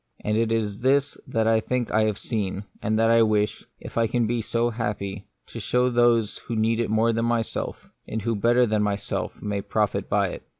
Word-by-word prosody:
And 105 - 0
this 115 - +3 0.4
it 120 - -9
is 140 +1 +3
that 115 -1 0
I 110 0 +4
think 125 +1 -2
I 110 0 +3
have 105 -2 -1
seen, 105 -4 -3 0.2
and 110 +1 0
that 115 +1 +3
I 115 0 +6
wish, 105 -1 +1 0.2
if - - -5
I 115 - +3
can 120 +1 +1
be 115 +1 0
so 115 +2 0
happy, 105 -3 -4 0.2
to - - -7
show 125 0 +1
to - - -5
those 120 -3 +2
who 115 - -5
need 110 +1 +1
it 115 - 0
more 110 +2 +2
than 115 +1 0
myself, 115 -1 -2 0.2
and 110 -2 -4
who 115 0 0
better 120 +4 +3
than 110 -2 +1
myself 100 -1 -2
may 100 -1 -2
profit 100 -1 -1
by 100 -2 +2
it. - - -8
110 Hz, 220 wpm, -25 LUFS, 105-115 Hz, 0.4 s, I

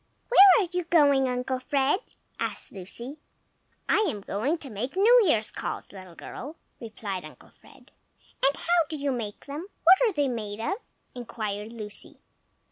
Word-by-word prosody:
"WHERE 400 -5 +9 0.2
are - - -13
you 360 -1 -2
going, 285 -6 +4
Uncle 250 +1 -2
Fred?" 275 +6 +1 0.4
asked - - -3
Lucy. 235 +9 -7 0.7
"I 435 - +3
am 210 -6 -4
going 225 - -1
to 280 -5 -6
make 235 - -4
New 465 +6 +6
Year's 220 -8 +2
calls, - - -5
little 185 -3 -12
girl," 290 - -8 0.2
replied 205 -5 -6
Uncle - - -14
Fred. - - -19 0.5
"And 275 +1 +3
how 345 0 +2
do 315 - -4
you 285 -1 -1
make 225 -5 -5
them? 295 +6 -6 0.2
What 370 +6 +7
are 475 -3 +4
they 290 -3 +1
made 215 -4 -4
of?" 230 +12 -1 0.4
inquired 215 -3 -5
Lucy. 215 -3 -9
260 Hz, 160 wpm, -27 LUFS, 215-315 Hz, 0.7 s, WHERE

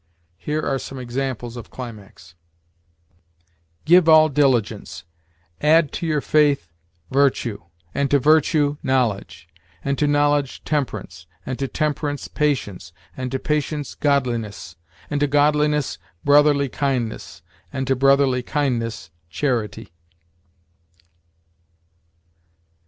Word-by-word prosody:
Here 150 +1 -2
are 135 -1 -1
some 135 - -8
examples 125 -1 -4
of 120 - -9
climax: 110 -9 -10 1.5
"Give 175 0 +6
all 155 0 +7
diligence; 125 -10 0 0.6
add 155 0 +4
to 170 - -4
your 150 -2 0
faith, 145 - +2 0.4
virtue; 130 -5 +1 0.3
and 140 -1 0
to 145 - +4
virtue, 150 0 +3
knowledge; 120 -10 -1 0.4
and 140 0 -1
to 150 - +2
knowledge, 145 -1 +1
temperance; 105 - -3 0.2
and 130 0 -4
to 135 - -1
temperance, 145 -1 -2
patience; 115 - -2 0.2
and 130 0 -4
to 135 - -1
patience, 150 +1 -2
godliness; 120 - -1 0.4
and 145 - 0
to 145 - +2
godliness, 150 - +2 0.3
brotherly 145 0 +4
kindness; 125 - -3 0.3
and 135 -1 -3
to 135 0 +1
brotherly 135 -1 +3
kindness, 120 - -2 0.2
charity." 110 - -2
140 Hz, 105 wpm, -22 LUFS, 120-145 Hz, 1.5 s, all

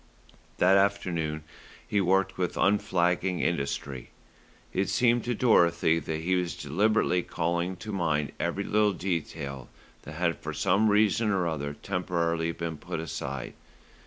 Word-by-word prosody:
That 95 +2 +5
afternoon 85 -6 0 0.4
he 100 - +1
worked 95 +1 +2
with 90 -2 -2
unflagging 90 -2 +1
industry. 70 -4 -2 0.6
It 95 +2 0
seemed 120 -1 +3
to 120 0 -1
Dorothy 85 -8 +3
that 80 +1 -4
he 90 +3 0
was 90 -4 -1
deliberately 90 +4 +1
calling 85 +2 -2
to 110 +4 -7
mind 80 -7 0
every 100 - -1
little 105 0 +2
detail 80 -7 -4 0.3
that 75 - -10
had 85 -1 -1
for 80 - -5
some 100 +7 +3
reason 105 +1 +3
or 95 -3 +1
other 75 -3 -3
temporarily 85 -2 -1
been 85 -1 -5
put - - -5
aside. 70 -4 -5
85 Hz, 135 wpm, -28 LUFS, 80-100 Hz, 0.6 s, That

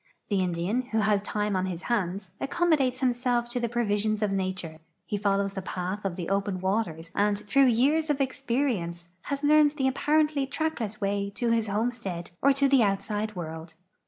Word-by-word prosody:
The 200 -2 +1
Indian, 180 +6 0
who 225 -3 -1
has 205 -1 +2
time 210 0 -1
on 185 0 0
his 180 -1 -5
hands, 195 -5 -2
accommodates 280 -5 +1
himself 245 -1 +1
to 245 +1 -2
the 235 -1 -1
pro 240 0 0
visions 210 +1 0
of 205 - +1
nature; 185 -4 -3 0.3
he - - -3
follows 200 -1 +1
the 190 - -4
path 185 +2 -4
of 195 -3 -2
the 175 -2 -4
open 195 -1 -1
ivaters 180 -4 -2
and, 205 0 +2
through 270 +7 +3
years 285 +7 +3
of 290 -1 +1
experience, 235 -11 -1 0.2
has 280 0 -3
learned 300 0 +5
the 265 -2 +2
ajqiarenth' 295 +1 +1
track 315 0 -2
less 215 -2 -4
way 200 0 -1
to 235 -1 0
his 225 -1 +2
homestead 205 -5 -2
or 280 - +5
to 275 0 +3
the 270 -2 +5
outside 210 +1 -1
world. 160 -1 -7
210 Hz, 190 wpm, -27 LUFS, 190-260 Hz, 0.3 s, learned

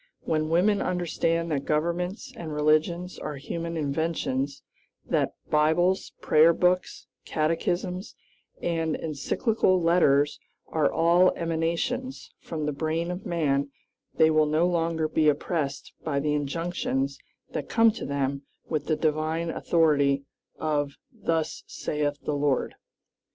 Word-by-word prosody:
When 155 -1 -1
women 195 +5 +3
understand 170 -2 0
that 140 -2 0
governments 175 +9 -1
and 165 -8 -6
religions 155 +4 +1
are 150 - -5
human 165 +4 -4
inventions; 145 -2 -1 0.4
that - - 0 0.2
Bibles, 160 +5 +2
prayerbooks, 170 +3 +3 0.2
catechisms, 175 +4 -1 0.5
and 165 -2 0
encyclical 185 - +1
letters 155 -4 +3 0.3
are 155 -2 +2
all 170 +3 +4
emanations 170 +11 -2
from 155 -2 -4
the 150 - 0
brain 160 +4 -2
of 180 +2 -6
man, 140 -4 +1 0.5
they 160 0 +5
will 155 -1 +4
no 155 +3 +2
longer 165 -2 +1
be 155 0 +3
oppressed 145 -1 -2
by 145 -3 0
the 150 +1 0
injunctions 145 -2 -2 0.3
that 145 - -4
come 225 -1 +5
to 225 - -7
them 140 -1 -1 0.3
with 150 -2 -2
the 155 - +2
divine 155 +2 0
authority 145 -6 +2 0.3
of 145 -2 -1 0.2
"Thus 165 -8 -2
saith 145 -1 -2
the 150 - -1
Lord." 140 -2 0
160 Hz, 120 wpm, -27 LUFS, 150-170 Hz, 0.5 s, they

